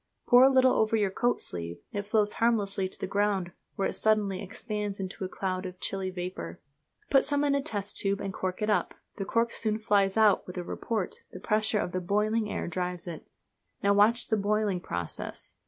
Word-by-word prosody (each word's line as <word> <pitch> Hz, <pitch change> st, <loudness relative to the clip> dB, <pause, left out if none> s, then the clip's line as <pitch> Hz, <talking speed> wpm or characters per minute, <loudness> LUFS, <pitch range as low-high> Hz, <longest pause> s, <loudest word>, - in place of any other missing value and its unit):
Pour 245 Hz, 0 st, +7 dB
a 265 Hz, -, +8 dB
little 260 Hz, -1 st, +5 dB
over 220 Hz, 0 st, +2 dB
your 205 Hz, -3 st, +1 dB
coat 240 Hz, +5 st, +1 dB
sleeve. 85 Hz, -1 st, -4 dB, 0.2 s
It 205 Hz, 0 st, -3 dB
flows 210 Hz, -1 st, +2 dB
harmlessly 200 Hz, -5 st, +1 dB
to -, -, -7 dB
the -, -, -2 dB
ground, 195 Hz, -2 st, 0 dB, 0.2 s
where 195 Hz, -, 0 dB
it -, -, -4 dB
suddenly 210 Hz, -3 st, +1 dB
expands 205 Hz, 0 st, -4 dB
into 190 Hz, 0 st, -5 dB
a 185 Hz, -, -3 dB
cloud 185 Hz, -1 st, -3 dB
of 180 Hz, 0 st, -10 dB
chilly 195 Hz, -1 st, -1 dB
vapour. 180 Hz, -, -6 dB, 0.5 s
Put 270 Hz, -, +6 dB
some 290 Hz, 0 st, +1 dB
in 285 Hz, -1 st, +2 dB
a 280 Hz, -, +2 dB
test 205 Hz, -5 st, -3 dB
tube 200 Hz, 0 st, +1 dB
and 195 Hz, -1 st, -4 dB
cork 185 Hz, +2 st, -3 dB
it 210 Hz, -, 0 dB
up. 180 Hz, -4 st, 0 dB, 0.2 s
The 195 Hz, -, -3 dB
cork 230 Hz, +3 st, +1 dB
soon 215 Hz, -1 st, 0 dB
flies 200 Hz, -2 st, +2 dB
out 215 Hz, -2 st, +4 dB
with 180 Hz, -, -8 dB
a 180 Hz, -, -2 dB
report 210 Hz, +2 st, -3 dB
the -, -, -8 dB
pressure 215 Hz, 0 st, +1 dB
of 180 Hz, -, -1 dB
the 185 Hz, -, -2 dB
boiling 210 Hz, +4 st, +1 dB
air -, -, -3 dB
drives 180 Hz, 0 st, -3 dB
it. 170 Hz, -3 st, -8 dB, 0.6 s
Now 200 Hz, 0 st, +4 dB
watch 215 Hz, +4 st, +4 dB
the 220 Hz, -, +2 dB
boiling 205 Hz, -2 st, +1 dB
process. 85 Hz, -, -5 dB
200 Hz, 205 wpm, -29 LUFS, 185-220 Hz, 0.6 s, a